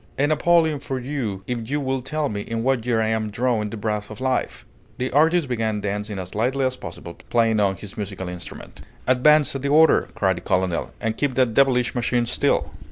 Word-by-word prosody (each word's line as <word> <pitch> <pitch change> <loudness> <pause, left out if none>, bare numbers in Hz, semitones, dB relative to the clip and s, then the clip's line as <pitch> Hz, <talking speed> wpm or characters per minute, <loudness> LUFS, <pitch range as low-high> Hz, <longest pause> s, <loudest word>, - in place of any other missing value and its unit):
A 140 - +3
napoleon 160 0 +3
for 135 -2 -4
you 120 -8 -4
if 120 -2 -4
you 145 +1 0
will 135 -2 -1
tell 155 +3 -2
me 105 -5 -4
in 115 +2 -3
what 130 -2 0
year 120 -2 +2
I 110 0 +1
am 110 -1 -1
drawing 110 -1 0
the 115 - -6
breath 105 -1 -3
of 110 - -8
life!" 130 0 -2 0.3
The 130 +1 -2
artist 160 +3 +3
began 110 -4 -1
dancing 105 0 -3
as 95 -1 -6
lightly 130 +5 0
as 130 0 0
possible, 85 - -9 0.2
playing 115 -2 +2
on 100 -2 +2
his 100 +2 -9
musical 100 -3 -5
instrument. 90 -1 -9 0.2
"Advance 140 +4 +4
at 135 - -3
the 140 - -1
order!" 160 +2 +5
cried 95 -3 +1
the - - -6
colonel, 90 -2 0
"and 110 -1 -2
keep 140 -3 0
that 125 -3 +2
devilish 125 -1 +3
machine 120 0 0
still!" - - +1
120 Hz, 210 wpm, -23 LUFS, 105-135 Hz, 0.3 s, order